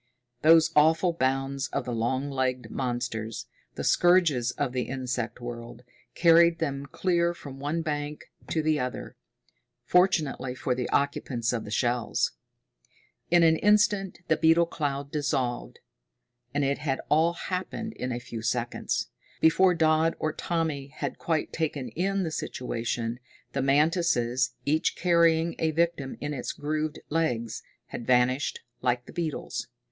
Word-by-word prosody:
Those 165 +1 +6
awful 160 +4 +4
bounds 135 -1 -1
of - - -3
the 125 - -3
long 130 +5 -1
legged 130 -3 -1
monsters, 120 -3 -3 0.3
the - - -4
scourges 170 -9 +4
of 130 +1 -2
the 125 -1 -2
insect 125 -3 -3
world, 120 0 -8 0.3
carried 170 0 +6
them 140 -3 -3
clear 175 +2 +1
from 135 -4 -10
one 150 +4 -2
bank 150 -1 -3 0.3
to 160 - 0
the 155 -1 +2
other 125 0 -4 0.7
fortunately 160 -8 +2
for 130 - -1
the 125 -1 -3
occupants 125 -4 0
of 115 -2 -3
the - - -7
shells. 120 +1 0 1.0
In 175 0 +5
an 160 -1 +5
instant 205 -2 +2
the 160 - +3
beetle 165 +1 +5
cloud 140 -3 -3
dissolved. 135 -5 -2 0.7
And 145 +1 0
it 140 +1 0
had 140 -3 -1
all 160 +3 +3
happened 190 +5 -4
in 130 -9 -4
a 120 - -2
few 120 -2 -7
seconds. 120 +1 -2 0.3
Before 180 +3 +5
Dodd 160 0 +3
or 155 0 -1
Tommy 160 -6 -2
had 145 +2 -5
quite 160 -2 -1
taken 145 -6 -2
in 195 - -1
the 165 - -3
situation, 120 -4 -3 0.3
the 135 - 0
mantises, 135 -4 +2
each 155 +2 +1
carrying 170 -1 +3
a 160 - +2
victim 160 -4 -1
in 145 0 -3
its 125 - -4
grooved 155 +1 -2
legs, 125 -8 -1 0.3
had 120 - -7
vanished 130 +2 +2 0.2
like 125 -1 0
the - - -12
beetles. 165 -3 -3
145 Hz, 140 wpm, -27 LUFS, 125-165 Hz, 1.0 s, Those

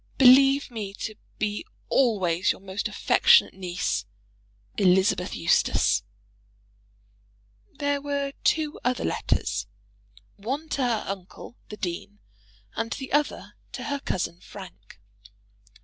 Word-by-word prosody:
] - - -34
Believe 270 +1 +6
me 205 -4 -5
to 215 - -5 0.2
be 210 -1 -2 0.2
always 190 -9 +2
your - - -6
most 195 +1 -3
affectionate - - +4
niece, 185 0 -2 0.7
ELI. 185 -3 +6 0.4
EUSTACE. 85 - +2 1.7
There 285 -1 -1
were 280 -1 -2
two 310 -1 +1
other 250 0 0
letters, - - -1 0.7
one 270 +10 -4
to 280 - -1
her 235 -4 +1
uncle, 195 +4 -7
the 210 - -7
dean, 195 +2 -5 0.6
and 230 - -2
the 265 -1 -7
other 295 0 0 0.2
to - - -5
her 285 -1 -2
cousin 180 -8 -3
Frank. 185 - -12
220 Hz, 115 wpm, -26 LUFS, 190-275 Hz, 1.7 s, Believe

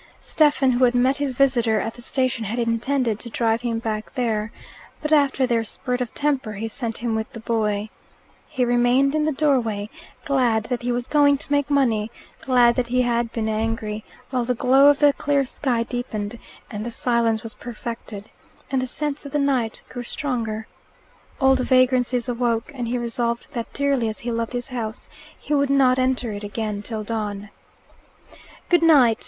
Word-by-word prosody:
Stephen, 290 -4 +2
who 250 +1 +2
had 245 0 +4
met 260 +3 +3
his 280 -3 -2
visitor 240 -5 +3
at 225 - -3
the 240 - -13
station, 255 -2 -1
had 220 +4 -3
intended 235 0 0
to 235 - -8
drive 225 0 0
him 235 -2 -1
back 220 -1 -4
there. 225 -3 -1 0.5
But 300 0 -1
after 275 -3 +3
their 235 -2 +1
spurt 250 +3 -3
of 245 - -3
temper 275 -7 0
he 220 +2 -4
sent 230 -1 -4
him 230 0 -2
with 220 0 -3
the 230 - -7
boy. 215 -2 -1 0.6
He 260 -5 0
remained 245 +3 +3
in 305 0 +1
the 310 - +1
doorway, 240 -8 0 0.3
glad 245 -6 +2
that 245 +1 -3
he 245 +1 -1
was 240 0 -1
going 285 -1 +4
to 285 - -10
make 285 -1 +2
money, 235 -7 +2 0.3
glad 245 -2 +4
that 250 -1 0
he 250 +1 +2
had 235 -1 0
been 220 -2 -2
angry; 220 -1 -2 0.3
while 250 -2 0
the 250 +1 -1
glow 265 +4 +5
of 290 -1 +6
the 290 0 +5
clear 280 -1 +1
sky 245 -2 -1
deepened, 230 -2 -4 0.3
and 210 0 -4
the 235 - -4
silence 230 -2 0
was 225 -1 -6
perfected, 230 -3 -7 0.4
and 265 -1 +1
the 255 - -2
scents 295 +2 -3
of - - -10
the - - +2
night 265 -6 0
grew 245 - -7
stronger. 235 -4 -3 0.7
Old 265 -1 +4
vagrancies 255 -1 +2
awoke, 240 +1 -1
and 245 -3 -4
he 245 +2 -1
resolved 235 0 -2
that, 235 -3 -4
dearly 280 -5 +1
as 215 - -7
he 240 - -3
loved 230 +1 -2
his 245 +2 -4
house, 225 -4 -5 0.3
he 300 - -4
would 280 -1 +2
not 260 -2 +4
enter 255 -2 0
it 205 0 -6
again 205 0 -3
till 215 0 -5
dawn. 210 -2 -4 1.2
"Goodnight!" 300 -10 +5
245 Hz, 185 wpm, -23 LUFS, 225-265 Hz, 1.2 s, of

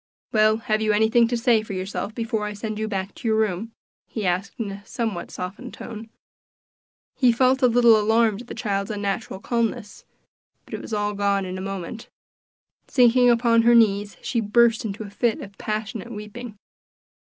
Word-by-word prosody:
"Well, 215 0 +4
have 215 -1 -1
you 215 -1 +2
anything 220 +2 +4
to 240 +1 -1
say 230 -1 +3
for 215 -2 -7
yourself 195 +3 -4
before 225 -2 -2
I 210 - -4
send 215 +1 -5
you 220 - -1
back 195 -2 -3
to - - -6
your 220 -1 +2
room?" 215 +1 -1 0.4
he 215 -3 -4
asked 185 +2 -1
in 210 -3 -3
a 200 +1 -9
somewhat 220 -4 -4
softened 200 +8 -7
tone. 225 -1 -8 1.1
He 250 -3 +4
felt 255 +3 +2
a 250 - +6
little 235 -1 +6
alarmed 220 0 +2
at 245 - -13
the - - -7
child's 200 -3 -2
unnatural 205 -1 -3
calmness; 225 -1 -2 0.6
but - - -14
it - - -4
was - - -10
all 210 -1 -1
gone 200 -1 0
in 185 0 -5
a - - -5
moment. 195 +3 -6 0.8
Sinking 245 -1 +5
upon 230 -1 +4
her 235 +1 +5
knees 205 -3 +3
she 245 - -1
burst 230 +2 +3
into 210 +1 -4
a 205 - -9
fit 230 +1 0
of 200 0 -10
passionate 215 +1 -4
weeping. 210 +1 -8
220 Hz, 185 wpm, -23 LUFS, 200-235 Hz, 1.1 s, a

